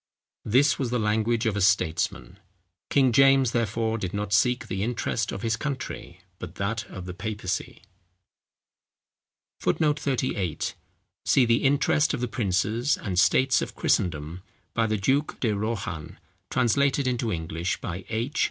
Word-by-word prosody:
This 135 +6 +3
was 130 -4 -1
the 125 - 0
language 110 +1 +1
of 110 -3 +1
a 105 - -1
statesman. 90 -6 0 0.5
King 135 -3 +4
James, 135 0 +5
therefore, 115 0 -1
did 95 -1 -4
not 100 0 -2
seek 125 +5 +3
the 95 - -4
interest 115 +3 -1
of 100 - -6
his 115 0 +1
country, 120 - -5 0.2
but 90 0 -8
that 105 +2 -2
of 95 -1 -9
the 90 - -6
papacy. 105 -1 -4 1.8
[Footnote 150 -2 +1
38: 120 - -1 0.5
See 130 - +4
_The 115 0 +2
Interest 145 +2 +2
of - - -6
the 125 - -1
Princes 110 +4 0
and 90 -3 -2
States 130 +6 +4
of - - -5
Christendom, 85 +1 0 0.3
by 115 -1 +1
the 110 0 0
Duke 135 +9 0
De 115 - +1
Rohan, 100 -7 -4 0.3
translated 135 +3 +2
into 125 -3 0
English 80 +1 -3
by 90 +2 -5
H. 120 +7 -2
110 Hz, 145 wpm, -26 LUFS, 95-130 Hz, 1.8 s, James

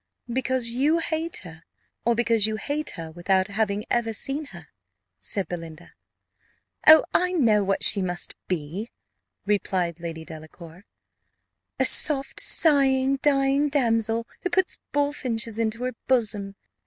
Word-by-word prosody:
"Because 260 -1 0
you 285 +7 +1
hate 325 0 -2
her 165 -2 -12 0.4
or 235 0 +2
because 230 -2 +2
you 220 - -2
hate 295 +7 -3
her 165 -1 -7
without 185 +3 0
having 205 0 -1
ever 230 -2 0
seen 275 +7 -1
her?" 175 - -13 0.5
said 190 - +1
Belinda. 165 -1 -9 0.9
"Oh, 315 0 +9
I 360 +1 +1
know 225 - +3
what 195 0 0
she 200 - +5
must 180 -1 -2
be," 180 +6 -4 0.6
replied 185 -4 -1
Lady 165 -1 -7
Delacour: 160 +3 -12 0.9
"a - - +4
soft, 280 -3 +4
sighing, 275 -3 +3
dying 275 +1 +1
damsel, 230 -4 0 0.2
who 360 - -2
puts 365 0 0
bullfinches 250 -6 -2
into 230 +2 -2
her 255 0 -2
bosom. 210 -6 0
225 Hz, 130 wpm, -24 LUFS, 185-275 Hz, 0.9 s, Oh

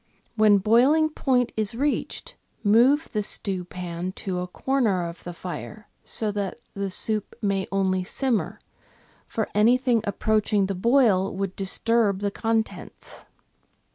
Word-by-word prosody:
When 215 -2 +5
boiling 250 +10 +4
point 255 -5 0
is 215 0 -2
reached, 285 +4 -2 0.3
move 245 +9 +4
the 210 - -1
stewpan 180 -3 -4
to 185 -2 -4
a 180 - -3
corner 205 -4 0
of 170 +1 -10
the 175 - -6
fire, 180 +4 -8
so 215 -2 0
that 205 +2 -4
the 200 -1 -3
soup 215 +2 +1
may 195 -3 -1
only 190 -1 +1
simmer, 245 +4 -1 0.7
for 220 - -2
anything 240 +2 +3
approaching 210 0 +1
the 195 - -2
boil 205 -2 +3
would 195 -1 -3
disturb 205 +1 +1
the 200 -1 -1
contents. 225 +1 -3
210 Hz, 130 wpm, -25 LUFS, 190-230 Hz, 0.7 s, When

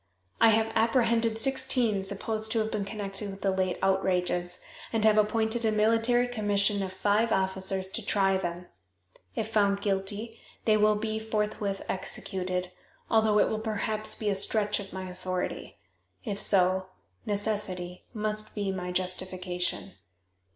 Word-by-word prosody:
I 225 - +7
have 220 0 +2
apprehended 230 0 +2
sixteen 250 -5 +1
supposed 215 +3 -1
to - - 0
have 220 0 0
been 205 -2 -2
connected 200 -1 -5
with 195 0 -8
the 195 - +2
late 185 -1 0
outrages, 180 -2 +1 0.3
and 220 -1 +2
have 215 -1 +6
appointed 220 +2 +1
a 220 - +3
military 225 +3 +3
commission 205 -3 +1
of 190 -1 -3
five 210 +4 +1
officers 190 0 0
to 230 +3 -4
try 195 -1 +2
them. 175 -1 -4 0.7
If - - -2
found 200 -2 +2
guilty 205 +3 -2 0.3
they 215 - +5
will 215 0 +4
be 220 +1 -2
forthwith 210 -2 -2
executed, 185 -1 -2 0.4
although 220 -1 +4
it - - +5
will 215 - -2
perhaps 215 0 0
be 210 -2 -1
a - - +2
stretch 205 +2 +2
of 200 -1 -8
my 190 0 -5
authority. 185 0 -4 0.5
If 205 -3 -3
so, 185 -1 +3 0.4
necessity 200 -4 -2
must 215 -1 -3
be 200 -2 -1
my 180 -1 -4
justification. 185 0 -2
205 Hz, 145 wpm, -28 LUFS, 190-220 Hz, 0.7 s, I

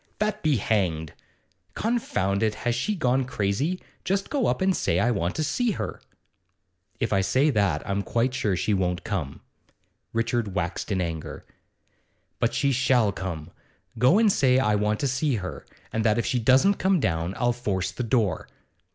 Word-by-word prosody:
'That 215 0 -1
be 150 -4 +2
hanged! 90 -8 0 0.6
Confound 105 - 0
it, 110 -1 +1
has 120 +1 -1
she 210 - -1
gone 130 -5 +1
crazy? 125 - -1 0.2
Just 195 +2 -1
go 280 -4 +1
up - - 0
and 190 -1 +2
say 85 - 0
I 120 +5 +2
want 90 -5 -1
to 155 - 0
see 230 - 0
her.' - - -5 1.0
'If 115 - 0
I 95 - +3
say 135 +9 +2
that, 100 - 0
I'm 100 0 0
quite 120 +5 0
sure 105 -7 0
she 105 +4 0
won't 90 -2 0
come.' 85 -10 -4 0.7
Richard 115 -3 -1
waxed 90 +3 -2
in 95 -2 +1
anger. 80 -3 -5 0.9
'But 115 0 0
she 140 -1 +2
shall 125 -4 +3
come! 85 -4 -6 0.5
Go 130 - +5
and 220 -2 +5
say 130 -7 +3
I 105 -5 +2
want 105 +1 +1
to 140 - +1
see 135 +1 0
her, 95 -4 -6 0.3
and 110 - 0
that 110 -1 +3
if 115 - 0
she 125 - 0
doesn't 130 - +4
come 190 -1 +3
down 85 - -1
I'll 120 -1 +2
force 100 -7 -2
the - - -5
door. 115 -4 0
115 Hz, 175 wpm, -25 LUFS, 95-135 Hz, 1.0 s, Go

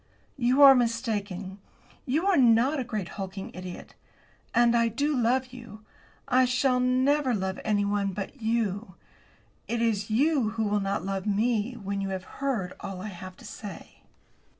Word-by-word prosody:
"You 255 +3 +4
are 275 -1 +11
mistaken. 210 -6 -2 0.5
You 305 +8 +1
are 395 -2 +4
not 255 +2 +4
a - - -1
great 215 -6 -4
hulking 195 0 -6
idiot. 180 -1 -9 0.6
And 240 0 +4
I 230 0 +3
do 285 +6 0
love 255 +1 +1
you. 225 -4 -11 0.4
I 255 -1 +4
shall 250 +1 +2
never 255 +1 +2
love 190 -1 -3
anyone 205 -1 0
but 205 +7 -7
you. 220 -4 -1 0.7
It 235 - -1
is 220 -3 0
you 265 +1 +2
who 225 - +1
will 210 0 +1
not 195 -1 -2
love 195 0 -3
me 220 +3 +1
when 200 -3 -4
you 195 - -2
have 190 -1 -4 0.2
heard 230 -10 -1
all 195 -2 -6
I 215 - -5
have 185 -1 -10
to - - -14
say." 205 -3 -10
225 Hz, 160 wpm, -27 LUFS, 200-250 Hz, 0.7 s, are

